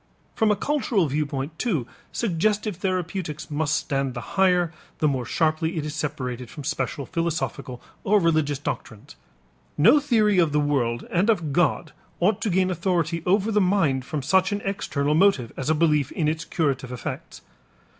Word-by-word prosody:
From 220 Hz, -2 st, +2 dB
a 210 Hz, -, +4 dB
cultural 245 Hz, -, +1 dB
viewpoint, 145 Hz, +1 st, -3 dB
too, 170 Hz, -, 0 dB, 0.3 s
suggestive 210 Hz, 0 st, 0 dB
therapeutics 180 Hz, -5 st, -3 dB
must 155 Hz, +1 st, +1 dB
stand 135 Hz, -2 st, -2 dB
the 120 Hz, -, -7 dB
higher, 180 Hz, -3 st, +3 dB, 0.2 s
the 155 Hz, -, +2 dB
more 130 Hz, -4 st, -1 dB
sharply 160 Hz, +1 st, 0 dB
it 155 Hz, -, -2 dB
is 150 Hz, -, -4 dB
separated 125 Hz, -6 st, -4 dB
from 145 Hz, -, -9 dB
special 135 Hz, +1 st, -2 dB
philosophical 160 Hz, -7 st, -3 dB, 0.2 s
or 210 Hz, +1 st, +4 dB
religious 155 Hz, -5 st, +1 dB
doctrines. 125 Hz, -, -6 dB, 0.6 s
No 230 Hz, -, +6 dB
theory 215 Hz, -8 st, +3 dB
of 165 Hz, -4 st, +2 dB
the 150 Hz, -, +3 dB
world 130 Hz, -5 st, 0 dB
and 185 Hz, +5 st, +2 dB
of 170 Hz, -10 st, +1 dB
God 175 Hz, -1 st, +1 dB, 0.3 s
ought 200 Hz, +4 st, +2 dB
to 225 Hz, -, 0 dB
gain 185 Hz, 0 st, +2 dB
authority 170 Hz, -2 st, 0 dB
over 200 Hz, +4 st, +2 dB
the 210 Hz, -1 st, +3 dB
mind 170 Hz, -9 st, +2 dB
from 145 Hz, +1 st, -4 dB
such 190 Hz, +6 st, +3 dB
an 205 Hz, 0 st, -2 dB
external 150 Hz, -7 st, -1 dB
motive 160 Hz, -, +3 dB
as 135 Hz, -, -3 dB
a 160 Hz, -, +3 dB
belief 150 Hz, -3 st, +2 dB
in 160 Hz, -4 st, 0 dB
its 160 Hz, +1 st, -1 dB
curative 135 Hz, -5 st, -1 dB
effects. 125 Hz, -, -6 dB
160 Hz, 165 wpm, -24 LUFS, 145-190 Hz, 0.6 s, No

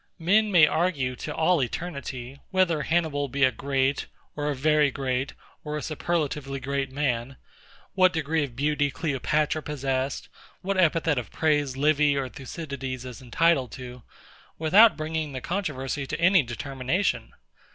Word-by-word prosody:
Men 205 Hz, +5 st, +3 dB
may 170 Hz, -5 st, +7 dB
argue 150 Hz, -6 st, 0 dB
to 150 Hz, -, -5 dB
all 165 Hz, 0 st, +3 dB
eternity, 135 Hz, -2 st, -5 dB
whether 180 Hz, -5 st, +2 dB
HANNIBAL 155 Hz, -3 st, 0 dB
be 140 Hz, +2 st, -1 dB
a 130 Hz, -, +5 dB
great, 135 Hz, +3 st, -1 dB, 0.3 s
or 150 Hz, 0 st, -2 dB
a 145 Hz, -, -1 dB
very 150 Hz, +2 st, +3 dB
great, 130 Hz, 0 st, -2 dB, 0.3 s
or 150 Hz, 0 st, -3 dB
a 150 Hz, -, -5 dB
superlatively 150 Hz, -4 st, -2 dB
great 140 Hz, 0 st, -2 dB
man, 130 Hz, -2 st, -1 dB, 0.6 s
what 185 Hz, -1 st, +5 dB
degree 160 Hz, -2 st, 0 dB
of 130 Hz, -5 st, -6 dB
beauty 145 Hz, +2 st, +1 dB
CLEOPATRA 150 Hz, +1 st, -1 dB
possessed, 135 Hz, -2 st, -2 dB, 0.4 s
what 195 Hz, +1 st, -1 dB
epithet 160 Hz, -4 st, +3 dB
of 120 Hz, -, -7 dB
praise 145 Hz, -4 st, 0 dB
LIVY 145 Hz, 0 st, +3 dB
or 135 Hz, -2 st, -2 dB
THUCYDIDES 135 Hz, -2 st, -6 dB
is 125 Hz, +1 st, -8 dB
entitled 130 Hz, 0 st, +2 dB
to, 125 Hz, -1 st, -9 dB, 0.6 s
without 200 Hz, +8 st, +6 dB
bringing 155 Hz, -2 st, -3 dB
the 130 Hz, -, -3 dB
controversy 145 Hz, -7 st, -3 dB
to 155 Hz, -, -4 dB
any 180 Hz, +1 st, +5 dB
determination. 135 Hz, -, -2 dB
145 Hz, 145 wpm, -26 LUFS, 135-160 Hz, 0.6 s, may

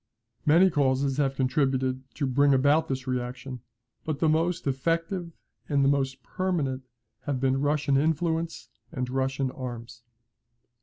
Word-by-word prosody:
Many 175 Hz, +5 st, +6 dB
causes 135 Hz, -2 st, +1 dB
have 135 Hz, -2 st, +1 dB
contributed 130 Hz, -1 st, +1 dB
to 145 Hz, -, -1 dB
bring 140 Hz, +2 st, +4 dB
about 145 Hz, +4 st, +3 dB
this 130 Hz, -1 st, -3 dB
reaction, 125 Hz, 0 st, -4 dB, 0.4 s
but 155 Hz, -2 st, -2 dB
the 160 Hz, -, +1 dB
most 165 Hz, +2 st, +1 dB
effective 165 Hz, +6 st, -1 dB, 0.4 s
and 140 Hz, -2 st, +3 dB
the -, -, +5 dB
most 135 Hz, -2 st, 0 dB
permanent 165 Hz, -9 st, -1 dB, 0.4 s
have 140 Hz, -3 st, -1 dB
been 135 Hz, 0 st, +1 dB
Russian 145 Hz, -1 st, +2 dB
influence 160 Hz, +2 st, -1 dB, 0.2 s
and 125 Hz, -1 st, -3 dB
Russian 135 Hz, 0 st, -1 dB
arms. 120 Hz, -2 st, -7 dB
140 Hz, 135 wpm, -27 LUFS, 130-155 Hz, 0.4 s, Many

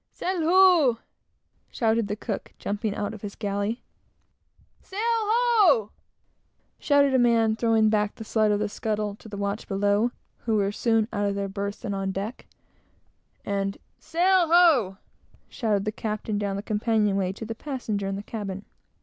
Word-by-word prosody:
"Sail 370 Hz, -2 st, -3 dB
ho!" 340 Hz, -7 st, +5 dB, 0.7 s
shouted 225 Hz, -2 st, 0 dB
the 205 Hz, -, -2 dB
cook, -, -, -5 dB
jumping 205 Hz, +1 st, -3 dB
out 205 Hz, +1 st, -3 dB
of 215 Hz, -, -10 dB
his 205 Hz, -1 st, -7 dB
galley; 205 Hz, +2 st, -3 dB, 1.0 s
"Sail 390 Hz, -, -8 dB
ho!" 445 Hz, -, +3 dB, 0.9 s
shouted 285 Hz, -2 st, +3 dB
a 260 Hz, -, +4 dB
man, 230 Hz, -2 st, +3 dB
throwing 225 Hz, -1 st, +3 dB
back 210 Hz, -1 st, +1 dB
the -, -, -8 dB
slide 215 Hz, -1 st, +1 dB
of 205 Hz, -, +2 dB
the 210 Hz, -, 0 dB
scuttle, 210 Hz, 0 st, -2 dB
to 220 Hz, -, -13 dB
the 205 Hz, -, -7 dB
watch 200 Hz, +2 st, -3 dB
below, 205 Hz, +3 st, +1 dB, 0.4 s
who 225 Hz, -, +2 dB
were 200 Hz, -1 st, +1 dB
soon 225 Hz, 0 st, +1 dB
out 205 Hz, -1 st, 0 dB
of 200 Hz, -, -2 dB
their 200 Hz, 0 st, -2 dB
berths 200 Hz, +2 st, -5 dB
and 205 Hz, -, -2 dB
on 195 Hz, 0 st, -2 dB
deck; 200 Hz, +6 st, -6 dB, 1.0 s
and 195 Hz, 0 st, -2 dB, 0.2 s
"Sail 360 Hz, +1 st, +2 dB
ho!" 310 Hz, -, +4 dB, 0.5 s
shouted 210 Hz, -4 st, -1 dB
the 215 Hz, -, 0 dB
captain 215 Hz, -1 st, -3 dB
down 200 Hz, -1 st, -2 dB
the 200 Hz, -, -4 dB
companion 215 Hz, -1 st, +1 dB
way 190 Hz, -2 st, 0 dB
to 225 Hz, -, -8 dB
the 225 Hz, -, -4 dB
passenger 225 Hz, -6 st, -4 dB
in 195 Hz, -, -2 dB
the 200 Hz, -, -6 dB
cabin. 200 Hz, -3 st, -6 dB
215 Hz, 165 wpm, -25 LUFS, 200-245 Hz, 1.0 s, ho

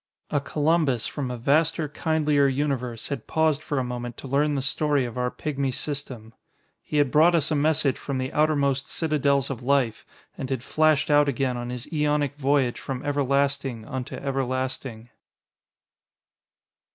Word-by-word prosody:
A 145 Hz, -, +1 dB
Columbus 150 Hz, -4 st, +1 dB
from 140 Hz, -4 st, -3 dB
a 125 Hz, -, -4 dB
vaster, 155 Hz, +6 st, +2 dB
kindlier 150 Hz, -1 st, +1 dB
universe 130 Hz, -4 st, -2 dB
had 140 Hz, -6 st, -5 dB
paused 160 Hz, -2 st, +1 dB
for 145 Hz, -2 st, -3 dB
a 130 Hz, -, +1 dB
moment 120 Hz, -1 st, -5 dB
to -, -, -8 dB
learn 145 Hz, +2 st, +1 dB
the 135 Hz, -, 0 dB
story 145 Hz, -1 st, +1 dB
of 120 Hz, -, -7 dB
our 125 Hz, 0 st, 0 dB
pigmy 140 Hz, 0 st, -2 dB
system. 130 Hz, -5 st, -4 dB, 0.5 s
He 150 Hz, -, -3 dB
had 145 Hz, -3 st, +3 dB
brought 165 Hz, +3 st, +5 dB
us 160 Hz, -1 st, +1 dB
a -, -, +2 dB
message 145 Hz, -2 st, +2 dB
from 140 Hz, -2 st, -3 dB
the 130 Hz, 0 st, -3 dB
outermost 140 Hz, -3 st, +1 dB
citadels 140 Hz, -4 st, +1 dB
of 130 Hz, -3 st, -5 dB
life 125 Hz, -3 st, +1 dB, 0.3 s
and 130 Hz, -, -5 dB
had 130 Hz, -3 st, -2 dB
flashed 155 Hz, 0 st, +2 dB
out 145 Hz, 0 st, +5 dB
again 130 Hz, -1 st, -1 dB
on 120 Hz, 0 st, -5 dB
his 125 Hz, -1 st, -5 dB
aeonic 150 Hz, -2 st, +1 dB
voyage 140 Hz, -3 st, +1 dB
from 130 Hz, -1 st, -5 dB
everlasting 140 Hz, -4 st, 0 dB
unto 130 Hz, -2 st, -5 dB
everlasting. 130 Hz, -3 st, -3 dB
140 Hz, 160 wpm, -25 LUFS, 130-150 Hz, 0.5 s, brought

